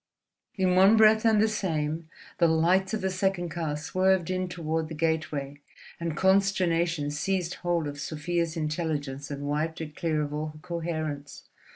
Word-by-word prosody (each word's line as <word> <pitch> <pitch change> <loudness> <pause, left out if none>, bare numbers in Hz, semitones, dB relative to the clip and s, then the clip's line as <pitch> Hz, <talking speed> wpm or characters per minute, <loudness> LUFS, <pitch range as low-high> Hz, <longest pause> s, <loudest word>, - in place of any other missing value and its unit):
In 185 -2 +2
one 195 +4 +6
breath 220 0 +6
and 220 -2 +5
the 220 - +4
same 160 -6 -2 0.3
the 170 - +5
lights 180 +5 +2
of 215 - -4
the 190 0 0
second 185 -2 0
car 160 -2 -3
swerved 185 +2 +1
in 185 0 -1
toward 160 -2 -2
the 160 - -7
gateway, 150 -3 -2 0.4
and 165 -2 -3
consternation 175 -5 +2
seized 180 +3 -1
hold 175 -3 0
of 145 0 -6
Sofia's 165 +3 -2
intelligence 150 -3 -3
and 145 -1 -5
wiped 150 +3 -1
it 150 -2 -7
clear 155 -3 0
of 145 0 -5
all 150 +1 -3
coherence. 155 -5 -4
165 Hz, 160 wpm, -27 LUFS, 150-185 Hz, 0.4 s, one